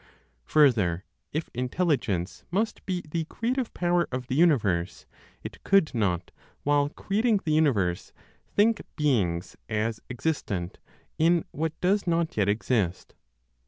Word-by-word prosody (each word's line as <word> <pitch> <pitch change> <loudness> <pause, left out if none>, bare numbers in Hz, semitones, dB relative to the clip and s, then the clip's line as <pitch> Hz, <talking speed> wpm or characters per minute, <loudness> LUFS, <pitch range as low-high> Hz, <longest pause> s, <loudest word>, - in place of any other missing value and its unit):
Further, 105 - +3 0.3
if 155 +2 -3
Intelligence 125 - -1
must 210 +5 -1
be 180 -2 -2
the 160 +1 -2
creative 245 - -2
power 175 0 +1
of 125 0 -3
the 125 - -4
universe, 105 - +2 0.4
it - - -9
could 195 -5 +3
not, 95 -7 -1 0.3
while 145 0 +2
creating 215 +7 +1
the 155 - 0
universe, 105 - +1 0.4
think 220 +1 +4
beings 100 - 0
as 110 0 -1
existent 120 - -3 0.4
in 165 +1 +3
what 160 +1 -3
does 195 +2 +2
not 170 -1 +1
yet 100 -2 +2
exist. 105 -4 0
145 Hz, 125 wpm, -27 LUFS, 105-175 Hz, 0.4 s, think